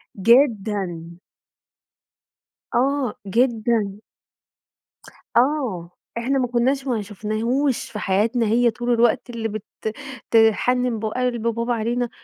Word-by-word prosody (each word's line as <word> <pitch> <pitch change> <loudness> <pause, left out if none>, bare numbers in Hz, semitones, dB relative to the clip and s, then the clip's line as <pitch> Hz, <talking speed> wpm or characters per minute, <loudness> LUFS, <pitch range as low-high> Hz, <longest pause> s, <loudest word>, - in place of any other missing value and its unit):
جدًا. 200 - +1 1.6
آه، 270 -2 +1
جدًا. 220 -2 +1 1.4
آه. 240 - +1 0.3
إحنا 270 +4 0
ما 250 - +1
كناش 260 +3 0
ما 235 -4 0
شفناهوش 220 +6 -2
في 210 - -5
حياتنا، 215 +5 +1
هي 235 +2 +3
طول 240 +2 -1
الوقت 235 +1 +2
اللي 230 -2 -3
بت 215 0 -5 0.7
تحنن 230 +2 +3
ب 220 - -4
قلب 240 0 -1
بابا 235 +1 0
علينا 235 +2 -1
235 Hz, 105 wpm, -22 LUFS, 215-250 Hz, 1.6 s, هي